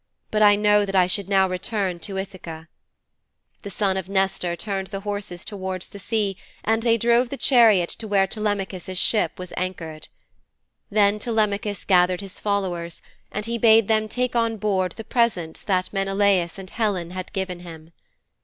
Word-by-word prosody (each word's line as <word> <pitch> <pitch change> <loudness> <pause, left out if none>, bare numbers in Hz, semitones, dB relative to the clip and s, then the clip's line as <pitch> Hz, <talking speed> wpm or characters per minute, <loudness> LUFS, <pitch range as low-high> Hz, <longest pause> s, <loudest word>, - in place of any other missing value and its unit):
But 215 - +1
I 205 -1 +7
know 210 0 +4
that 195 -1 -3
I 185 -1 +6
should 190 +1 0
now 190 -1 +4
return 185 0 -2
to 195 +3 -3
Ithaka.' 175 -4 -7 0.9
The 200 - -7
son 195 -1 0
of 190 0 -4
Nestor 190 -3 0
turned 195 0 -3
the 195 0 -6
horses 205 -3 -5
towards 190 -2 -5
the 200 - -10
sea 205 -2 -1 0.3
and 225 +1 +1
they 230 0 +3
drove 235 +2 +3
the 275 - -5
chariot 225 -11 +5
to 220 - -5
where 200 -2 +3
Telemachus' 195 -2 -3
ship 215 +3 +2
was 185 -2 -8
anchored. 165 -4 -5 0.8
Then 205 0 +3
Telemachus 210 -2 -1
gathered 180 -1 +3
his 195 -1 -9
followers, 180 -5 -2 0.3
and 210 - -3
he 235 0 -2
bade 225 -2 +6
them 215 -1 +2
take 250 +2 -1
on 230 -1 +1
board 190 -3 0
the 225 - -8
presents 215 -9 0
that 185 -1 -1
Menelaus 195 -2 +1
and 190 -1 -10
Helen 195 -7 -1
had 185 0 -6
given 190 -3 -3
him. 165 -2 -12
195 Hz, 170 wpm, -23 LUFS, 185-215 Hz, 0.9 s, I